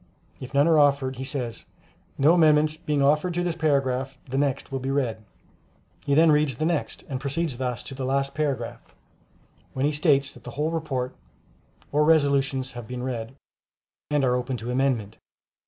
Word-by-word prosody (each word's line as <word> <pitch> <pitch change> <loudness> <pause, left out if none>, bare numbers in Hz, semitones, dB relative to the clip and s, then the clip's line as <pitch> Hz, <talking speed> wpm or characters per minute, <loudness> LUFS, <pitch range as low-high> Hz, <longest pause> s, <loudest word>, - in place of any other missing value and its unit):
If 130 0 -8
none 140 +3 +5
are 160 -2 +5
offered, 140 -3 +2
he 130 - -4
says, 130 -4 -4 0.5
"No 150 +5 +5
amendments 155 -2 +4
being 150 -3 -1
offered 150 +5 +2
to 175 - 0
this 175 -2 -1
paragraph, 135 -4 0
the 130 - -5
next 140 -2 -1
will 135 - -2
be 130 +1 -4
read;" 120 -6 -1 0.8
he 140 - +3
then 160 +1 +6
reads 150 -3 +2
the 155 - -1
next, 165 -3 -2
and 130 -2 -4
proceeds 140 -2 -2
thus 125 -2 -2
to - - -8
the 135 0 -5
last 135 +1 0
paragraph, 135 -5 -3 0.8
when 135 +1 0
he 150 - +2
states 145 -2 +2
that - - -16
the - - -8
whole 155 +2 0
report 135 -6 -3 0.8
or 150 +1 +3
resolutions 140 -4 +2
have 120 -3 -8
been 125 +1 -5
read, 125 -1 -4 0.7
and 150 -1 +1
are 125 -1 +3
open 125 +1 -2
to 120 +1 -5
amendment. 125 -5 0
140 Hz, 180 wpm, -25 LUFS, 130-150 Hz, 0.8 s, then